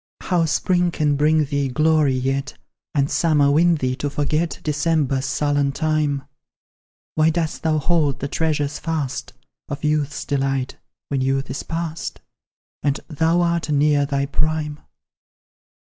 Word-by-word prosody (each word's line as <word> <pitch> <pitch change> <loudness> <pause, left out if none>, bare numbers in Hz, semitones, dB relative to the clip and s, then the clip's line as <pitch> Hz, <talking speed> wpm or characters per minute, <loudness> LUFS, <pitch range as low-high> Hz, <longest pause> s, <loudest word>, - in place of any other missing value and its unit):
How 175 -3 +1
spring 175 +3 +1
can 150 -3 +1
bring 155 +2 +3
thee 140 0 -1
glory, 155 0 +3
yet, 135 +2 -2 0.4
And 140 -1 +3
summer 150 -3 +3
win 170 +3 +4
thee 130 -4 -1
to 145 - -2
forget 150 +4 -1
December's 145 -3 0
sullen 145 -1 +1
time! 155 -3 0 0.9
Why 155 +1 +3
dost 160 -1 -2
thou 160 -2 +1
hold 150 -2 +1
the 140 - -2
treasure 150 -1 0
fast, 150 -2 -4 0.4
Of 140 - -5
youth's 150 -1 0
delight, 135 -2 -1 0.3
when 140 -2 0
youth 135 +1 0
is 140 - -3
past, 165 -1 -4 0.6
And 140 -1 0
thou 165 +3 +2
art 170 -2 0
near 145 -1 +3
thy 140 0 0
prime? 150 +1 -1
150 Hz, 135 wpm, -22 LUFS, 140-160 Hz, 0.9 s, win